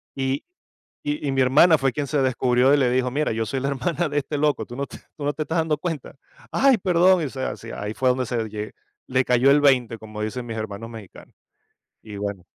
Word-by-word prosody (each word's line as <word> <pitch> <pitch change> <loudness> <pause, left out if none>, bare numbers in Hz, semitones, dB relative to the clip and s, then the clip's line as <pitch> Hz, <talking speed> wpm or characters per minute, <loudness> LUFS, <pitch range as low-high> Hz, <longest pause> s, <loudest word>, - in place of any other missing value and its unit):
Y 135 +1 -1 0.6
y 145 0 -2
y - - 0
mi 135 0 +1
hermana 150 +6 +6
fue 135 -3 0
quien 145 -1 -2
se 145 0 0
descubrió 130 0 +3
y - - +5
le 130 -3 +3
dijo: 125 0 +1
"Mira, 150 +4 0
yo 110 0 -1
soy 135 - -2
la 140 - -1
hermana 155 +5 -1
de 145 - -3
este 145 +1 -4
loco, 150 0 +1
tú 120 - -10
no 140 +2 -2
t - - -10 0.2
¿tú 150 - -7
no 145 - 0
te 155 - -3
estás 160 +2 -1
dando 160 -2 0
cuenta?". 155 -4 -5 0.4
"Ay, 270 -2 +4
perdón", 180 -2 +3
o - - -3
sea 130 0 -4
si, 115 - -10
y - - -6
ahí 105 +1 -5
fue 130 +3 +1
donde 125 0 +1
se 115 -2 -2
lle 105 0 -6 0.3
le 130 0 +1
cayó 125 +2 +4
el 145 +1 +5
20, 125 -5 +3
como 110 -1 -8
dicen 115 +3 -4
mis 115 -1 -5
hermanos 110 +1 -5
mexicanos. 110 -5 -12 0.7
Y 105 -2 -9
bueno 100 -3 -4
130 Hz, 245 wpm, -23 LUFS, 115-145 Hz, 0.7 s, hermana